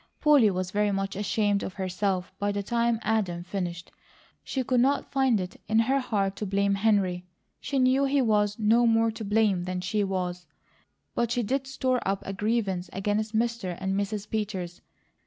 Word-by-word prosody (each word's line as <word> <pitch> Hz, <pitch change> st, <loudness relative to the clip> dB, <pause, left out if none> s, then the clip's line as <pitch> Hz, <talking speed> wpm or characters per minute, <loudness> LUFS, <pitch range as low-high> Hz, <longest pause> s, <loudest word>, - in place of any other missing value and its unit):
Polly 290 Hz, -8 st, +5 dB
was 185 Hz, -1 st, -2 dB
very 210 Hz, +1 st, +1 dB
much 195 Hz, 0 st, -2 dB
ashamed 205 Hz, 0 st, +1 dB
of 185 Hz, -, -5 dB
herself 185 Hz, -1 st, -2 dB
by 205 Hz, 0 st, 0 dB
the 200 Hz, 0 st, -2 dB
time 235 Hz, +1 st, +1 dB
Adam 195 Hz, -6 st, 0 dB
finished. 175 Hz, -2 st, -5 dB, 0.5 s
She 265 Hz, -, -2 dB
could 250 Hz, 0 st, +1 dB
not 270 Hz, +4 st, +1 dB
find 265 Hz, -5 st, +2 dB
it 180 Hz, 0 st, -6 dB
in 220 Hz, -, +1 dB
her 260 Hz, +5 st, +3 dB
heart 200 Hz, -6 st, -1 dB
to 210 Hz, -, -3 dB
blame 200 Hz, +1 st, +1 dB
Henry; 195 Hz, -4 st, +1 dB, 0.3 s
she 275 Hz, +1 st, -3 dB
knew 260 Hz, +1 st, +3 dB
he 275 Hz, +1 st, +2 dB
was 210 Hz, -4 st, +2 dB
no 230 Hz, +2 st, +4 dB
more 225 Hz, 0 st, +3 dB
to 220 Hz, 0 st, -7 dB
blame 205 Hz, -3 st, +2 dB
than 185 Hz, 0 st, -3 dB
she 195 Hz, +3 st, -1 dB
was; 180 Hz, -2 st, -3 dB, 0.7 s
but 235 Hz, -1 st, 0 dB
she 240 Hz, +1 st, 0 dB
did 270 Hz, +5 st, -1 dB
store 260 Hz, -2 st, 0 dB
up 195 Hz, 0 st, -1 dB
a 195 Hz, -, -4 dB
grievance 200 Hz, -4 st, -1 dB
against 210 Hz, +3 st, -1 dB
Mr. 225 Hz, -6 st, -1 dB
and 190 Hz, 0 st, -1 dB
Mrs. 200 Hz, +1 st, -2 dB
Peters. 195 Hz, -5 st, -4 dB
205 Hz, 180 wpm, -27 LUFS, 190-235 Hz, 0.7 s, Polly